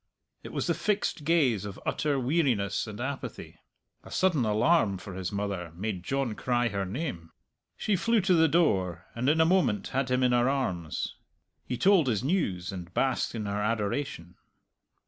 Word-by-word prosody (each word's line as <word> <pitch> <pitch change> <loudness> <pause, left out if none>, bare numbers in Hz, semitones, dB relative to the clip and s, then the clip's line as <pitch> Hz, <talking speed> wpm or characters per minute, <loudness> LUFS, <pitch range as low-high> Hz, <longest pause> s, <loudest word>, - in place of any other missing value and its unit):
It - - -9
was - - -2
the - - +2
fixed 205 -7 -1
gaze 140 - +3
of 100 -2 -7
utter 145 -3 0
weariness 125 - +1
and 105 0 -8
apathy. 135 +2 -5 0.4
A - - -12
sudden 175 -9 +2
alarm 110 - +3
for 95 +1 -9
his 90 -1 -4
mother 100 -4 -3
made 95 0 -3
John 135 +4 -1
cry 120 +1 0
her 100 -2 -2
name. 90 - -4 0.5
She 210 - +1
flew 230 +5 +2
to 190 0 +3
the 160 -1 +5
door, 95 - +1
and 125 +3 0
in 160 +2 +3
a 160 - +6
moment 165 - +2
had 130 -1 -1
him 125 0 +2
in 125 - +4
her 120 +1 +3
arms. 90 - -2 0.5
He 125 - -2
told 190 -4 +4
his 110 -5 0
news, 105 - 0
and 90 -2 -7
basked 130 -2 0
in 110 -2 -3
her 100 +1 -2
adoration. 105 - -2
120 Hz, 175 wpm, -28 LUFS, 100-150 Hz, 0.5 s, a